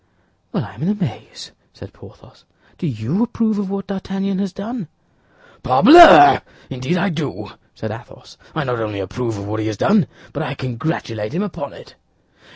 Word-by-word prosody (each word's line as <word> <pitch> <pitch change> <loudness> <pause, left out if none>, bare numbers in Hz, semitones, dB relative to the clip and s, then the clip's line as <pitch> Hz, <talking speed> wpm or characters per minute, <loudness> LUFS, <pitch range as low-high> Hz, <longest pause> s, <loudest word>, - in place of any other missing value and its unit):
"Well, - - -3
I - - -12
am - - -13
in 170 - -1
a 210 - +1
maze," 165 - -7 0.2
said - - -13
Porthos; - - -19 0.4
"do 175 - -3
you 130 - -2
approve 225 -3 0
of 200 -2 -3
what 195 -1 -4
D'Artagnan 195 0 -4
has 200 -2 -2
done?" 205 0 -6 0.7
"Parbleu! 350 +3 +8 0.3
Indeed 130 +7 -2
I 200 +3 0
do," 155 -5 -5 0.2
said - - -6
Athos; - - -13 0.2
"I 155 - -1
not 125 -3 -3
only 105 -2 -4
approve 115 +4 -4
of 100 - -7
what 110 +1 -4
he 110 - -2
has 110 -2 -4
done, 200 - +2 0.3
but 145 - -4
I 150 -2 -4
congratulate 120 -3 -4
him 190 - -1
upon 205 - -6
it." - - -15
175 Hz, 175 wpm, -19 LUFS, 125-200 Hz, 0.7 s, Parbleu